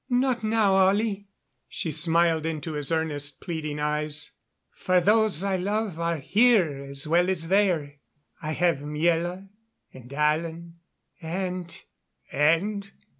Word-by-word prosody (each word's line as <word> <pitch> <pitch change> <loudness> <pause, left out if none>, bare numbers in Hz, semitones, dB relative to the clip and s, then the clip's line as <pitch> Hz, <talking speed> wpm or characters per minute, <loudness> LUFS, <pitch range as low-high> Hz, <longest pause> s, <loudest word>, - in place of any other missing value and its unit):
"Not 250 -2 +1
now, 215 -2 +2
Ollie." 205 0 0 0.4
She 160 - -3
smiled 165 0 +2
into 160 0 -4
his 145 -1 -4
earnest, 150 -3 -2
pleading 155 -4 -4
eyes. 150 0 -2 0.4
"For 185 0 +2
those 210 -2 +2
I 195 -1 0
love 200 -1 -2
are 170 0 0
here 180 - +2
as 140 +1 -3
well 175 +3 +3
as 165 -3 -2
there. 175 -8 +1 0.4
I 155 +1 -3
have 170 -4 +1
Miela 170 +5 -1 0.5
and 125 0 -13
Alan 165 +3 -1 0.4
and 180 +1 -4 0.3
" - - -33
"And?" 195 +8 +1
170 Hz, 125 wpm, -26 LUFS, 150-195 Hz, 0.5 s, well